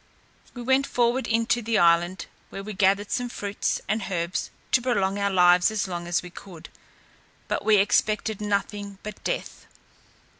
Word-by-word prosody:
We 245 - -6
went 265 +2 +2
forward 240 +1 +1
into 230 +1 +1
the 225 0 0
island, 175 +2 +3 0.2
where 195 - -7
we 215 +1 -6
gathered 200 +1 +2
some 245 -2 -1
fruits 205 -3 -2
and 215 -2 -1
herbs 170 0 -2 0.2
to 255 - +4
prolong 200 -5 0
our 200 0 +1
lives 180 -1 +5
as 215 -2 -2
long 175 -1 -5
as 175 0 0
we 180 - -10
could; 175 -3 -12 0.8
but - - -2
we 215 -1 +5
expected 210 +1 +1
nothing 205 -1 -2
but 210 -1 -8
death. - - -4
205 Hz, 160 wpm, -25 LUFS, 185-225 Hz, 0.8 s, lives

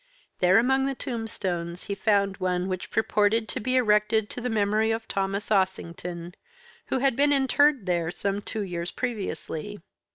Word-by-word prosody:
There 185 +2 +5
among 265 +3 +3
the 275 - -2
tombstones 185 -9 -4
he 200 - -4
found 200 -1 +1
one 180 0 -1
which 185 -1 -4
purported 220 +1 +2
to - - -3
be 255 +3 -1
erected 210 -2 +3
to 245 - -6
the 250 - -2
memory 215 0 +2
of 225 0 -2
Thomas 195 +2 -2
Ossington, 175 -3 -1 0.5
who - - 0
had 265 -1 +2
been 290 +3 +3
interred 280 -2 +3
there 170 -3 0
some 200 +3 -2
two 220 +1 -4
years 175 -3 -3
previously. 205 -4 -4
210 Hz, 160 wpm, -26 LUFS, 185-230 Hz, 0.5 s, There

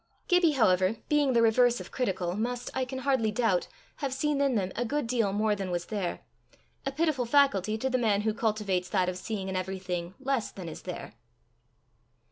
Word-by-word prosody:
Gibbie, 355 -4 +4
however, 190 -5 +3
being 290 -3 +3
the 230 -1 +4
reverse 240 +2 +4
of - - -9
critical, 185 -8 -1
must, 245 +3 -3
I 260 -1 0
can 260 +1 -6
hardly 260 -6 +2
doubt, 210 -5 +1 0.3
have 275 -3 -2
seen 290 +1 0
in 275 -3 +2
them 190 -3 0
a 240 - 0
good 290 +3 -1
deal 230 -4 +1
more 210 +1 +1
than 195 -2 -4
was 175 -1 -2
there 200 -5 -3 0.7
a - - 0
pitiful 290 -4 0
faculty 220 -6 +3
to 260 - -1
the 255 -1 +1
man 210 -4 +2
who 215 0 0
cultivates 210 -5 -1
that 185 -3 +1
of 185 - -3
seeing 195 -2 -4
in 190 - -3
everything 185 -1 -3
less 270 -4 -1
than 185 -3 -8
is 160 - -7
there. - - -7
220 Hz, 195 wpm, -29 LUFS, 190-260 Hz, 0.7 s, Gibbie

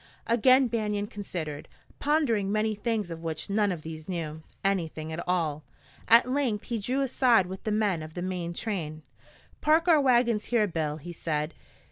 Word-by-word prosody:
Again 255 +3 +5
Banion 210 -3 -1
considered, 175 -8 -6 0.3
pondering 250 -10 +1
many 215 +1 +1
things 210 -3 -2
of 165 0 -6
which 165 +3 -4
none 205 -1 +2
of 165 -4 -5
these 160 +1 -8
knew 160 -3 -4 0.2
anything 160 -5 -1
at 170 - -4
all. 160 -4 0 0.4
At 230 +2 +7
length 255 -6 0
he 235 -2 -3
drew 255 +7 -1
aside 250 -6 +4
with 190 +1 -8
the 215 - 0
men 205 -6 +1
of 155 0 -9
the 175 - -3
main 180 -2 -3
train. 160 -7 -4 0.6
"Park 320 +3 +3
our 320 -4 +6
wagons 240 -5 +3
here, 235 -3 +2
Bill," 155 -5 -2
he 175 +3 -8
said. 155 -1 -2
200 Hz, 170 wpm, -28 LUFS, 165-235 Hz, 0.6 s, At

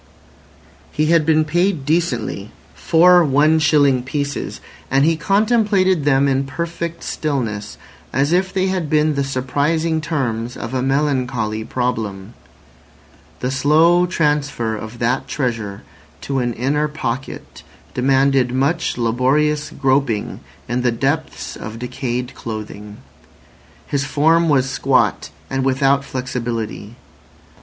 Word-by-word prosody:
He 155 +1 +1
had 160 -2 +3
been 155 -1 +3
paid 175 -1 0
decently—four 160 - +2
one 150 +2 +3
shilling 145 -4 +3
pieces—and 140 0 -3
he 165 +1 +3
contemplated 195 - +2
them 140 -1 +3
in 135 0 +1
perfect 170 +2 -4
stillness, 115 -9 -3 0.3
as 140 +3 +1
if 185 +1 +2
they 190 -1 0
had 185 -5 -1
been 155 0 +2
the 140 -1 0
surprising 145 +5 0
terms 125 -7 -2
of 115 +2 -6
a 130 - 0
melancholy 130 -5 0
problem. 110 -4 -3 1.1
The 125 - -1
slow 160 +6 +4
transfer 145 -9 0
of 110 +2 -8
that 120 +2 0
treasure 115 -7 -3 0.4
to 135 -1 -2
an 120 -1 -1
inner 145 +6 0
pocket 135 -4 -5 0.3
demanded 135 0 +2
much 140 +5 0
laborious 135 +6 +1
groping 135 -5 0 0.3
in 120 +2 -1
the 125 -1 +2
depths 145 +6 -2
of 110 +1 -7
decayed 125 +1 -4
clothing. 105 -3 -7 0.9
His 140 -1 -1
form 160 +3 +2
was 135 -3 +3
squat 130 -10 +1 0.2
and 135 +7 -2
without 135 +1 +2
flexibility. 120 -4 -4
135 Hz, 115 wpm, -19 LUFS, 125-155 Hz, 1.1 s, slow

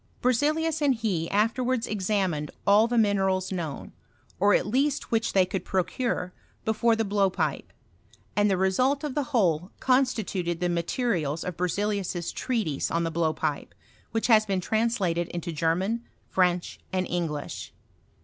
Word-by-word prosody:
B«zeliuv 305 +6 +1
and 280 -3 +3
he 195 -8 -1
afterwards 230 +3 +1
examined 190 -7 -1 0.2
all 205 +3 +5
theminerab 195 -5 +2
knowD^ 165 -6 -5 0.5
or 200 +2 +5
at - - +1
least 270 +6 0
which 225 -1 +1
they 190 -2 +5
could 185 +1 -4
procure, 185 0 -1 0.3
before 225 +1 +2
the 225 0 0
Ui>w> 200 -1 +2
pipe; - - -2 0.6
and 205 0 +3
the 190 - +2
resuh 255 +10 +2
of 295 -3 -3
the 290 -1 -1
whole 180 -8 +1
constituted 220 -10 +1
the 180 0 0
materials 170 - -1
of 180 - -4
Berzelius's 180 -1 -1
treatise 215 - -1
on 170 0 0
the 165 - -1
blowpipe, 155 -2 -1 0.3
which 225 - -1
has 220 -3 +6
been 195 -3 -1
translated 195 -5 0
into 170 0 -5
German, 180 +9 0 0.3
French, 180 -1 +1
andi 185 -1 0
Kiglish. 165 -4 -3
195 Hz, 140 wpm, -27 LUFS, 175-230 Hz, 0.6 s, has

